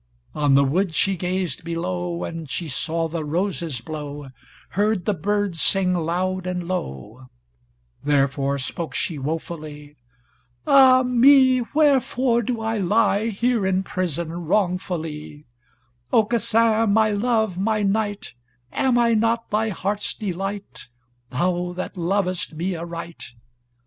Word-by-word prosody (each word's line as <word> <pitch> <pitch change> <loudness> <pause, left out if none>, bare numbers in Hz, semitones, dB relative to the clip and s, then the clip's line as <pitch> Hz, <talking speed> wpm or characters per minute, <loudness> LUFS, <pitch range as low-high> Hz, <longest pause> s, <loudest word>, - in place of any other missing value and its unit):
On 145 -2 +2
the 140 - +6
wood 165 +5 0
she 195 -1 +2
gazed 180 -3 -2
below, 175 +1 -3
And 165 -3 -6
she 170 +4 -3
saw 165 +3 -1
the 160 0 -4
roses 165 - -2
blow, 145 0 -7 0.4
Heard 205 -1 0
the 210 - +2
birds 200 0 -1
sing 190 -2 +3
loud 180 +2 -1
and 180 -1 -3
low, 115 - -5 0.8
Therefore 140 -1 +1
spoke 140 +2 -5
she 160 -4 -2
wofully: 150 0 -6 0.7
"Ah 260 -2 +7
me, 255 +1 +5
wherefore 265 -5 +3
do 235 0 -3
I 225 0 -1
lie 205 +2 +2
Here 230 +1 0
in 190 0 +1
prison 170 -3 -3 0.2
wrongfully: 165 -6 -2 0.7
Aucassin, 225 0 +3
my 215 +1 +3
love, 220 -3 0
my 215 +1 +1
knight, 205 0 -1 0.4
Am 260 -2 +2
I 235 -1 +3
not 230 +1 +1
thy 220 +1 +1
heart's 205 +1 -2
delight, 195 - -5 0.4
Thou 175 +6 -1
that 185 +2 -5
lovest 185 -1 -1
me 180 +4 -2
aright! 170 -4 -7
185 Hz, 125 wpm, -23 LUFS, 160-215 Hz, 0.8 s, Ah